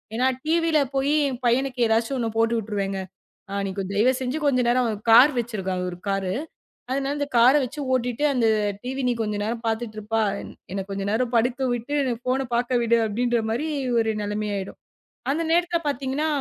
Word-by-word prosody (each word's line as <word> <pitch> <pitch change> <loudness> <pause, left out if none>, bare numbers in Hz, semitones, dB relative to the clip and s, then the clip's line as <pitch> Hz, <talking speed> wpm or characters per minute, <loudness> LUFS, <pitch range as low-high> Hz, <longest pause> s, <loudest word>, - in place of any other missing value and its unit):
ஏன்னா 255 +3 +2 0.2
டிவில 330 -1 +2 0.2
போயி 275 +2 +2
என் 255 -1 -5
பையனுக்கு 250 0 +1
எதாச்சு 225 +4 +1
ஒண்ணு 230 -2 -1
போட்டு 230 +1 +2
விட்டுருவேங்க. 200 -2 -3 0.5
அ - - -4
நீ - - -3
செஞ்சு 195 0 -3
தயவு 255 +7 +1
கொஞ்ச 255 -3 +3
நேரம் 245 -1 +2 0.2
கார்r 255 +6 +8
வச்சிருக்கான். 190 -6 -3
ஒரு 175 - -9
கார் 195 -2 -1 0.6
அதனால 275 +1 -1
அந்த 285 - -1
கார் 245 +4 +7
வச்சு 255 +4 -6
ஓட்டிட்டு 245 +1 -1
அந்த 245 -3 +1 0.4
டிவி 265 +2 -3
நீ - - +3
கொஞ்ச 210 -2 -1
நேரம் 230 +2 -2
பாத்துட்டு 225 0 -2
இருப்பா. 220 +1 -1 0.5
என்னக் 195 0 -4
கொஞ்ச 195 0 -3
நேரம் 240 +3 0
படுக்கவிட்டு, 245 +2 0 0.3
போனை 265 +1 +1
பார்க்க 240 +1 +1
விடு 235 0 +3
அப்படின்ற 240 +3 0
மாரி 245 +8 -1 0.3
ஒரு 225 -1 +2
நிலைமை 210 +1 -2
ஆயிடும். 195 0 -5 0.5
அந்த 315 +4 0
நேரத்துல 345 0 +2
பார்த்தீங்கன்னா, 280 +2 -1
240 Hz, 170 wpm, -24 LUFS, 220-265 Hz, 0.6 s, கார்r